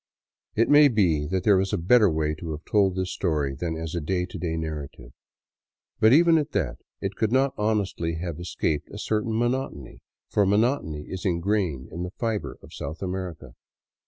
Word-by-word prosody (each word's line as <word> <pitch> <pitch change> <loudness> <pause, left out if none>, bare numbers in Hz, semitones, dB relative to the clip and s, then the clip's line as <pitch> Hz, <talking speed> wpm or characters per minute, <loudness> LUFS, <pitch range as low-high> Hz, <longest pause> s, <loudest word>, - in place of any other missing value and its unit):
It 115 - +3
may 145 0 +7
be 90 - +2
that 95 +2 -1
there 100 -2 +5
was 95 +2 0
a - - +2
better 105 +5 +5
way 80 -1 0
to 85 -2 -5
have 75 +1 -8
told 100 -3 +2
this 95 -1 -2
story 75 -7 0
than 80 +3 -3
as 80 0 -5
a 85 - -2
day 90 +4 -1
to - - -8
day 80 -2 -2
narrative. 75 -6 -6 0.9
But 110 - +6
even 165 +3 +6
at 150 0 -4
that, 80 -11 -1 0.2
it 95 +1 -3
could 110 -1 0
not 135 +1 +3
honestly 100 -6 -1
have 85 -1 -5
escaped 80 -3 -2
a - - -9
certain 110 +1 -1
monotony; 120 - -2 0.3
for 105 - +2
monotony 105 - +1
is 95 +4 -7
ingrained 90 -6 0
in 85 - -5
the 90 - -3
fiber 115 -3 -2
of - - -14
South 80 +5 -6
America. 90 -8 -5
95 Hz, 190 wpm, -25 LUFS, 80-110 Hz, 0.9 s, may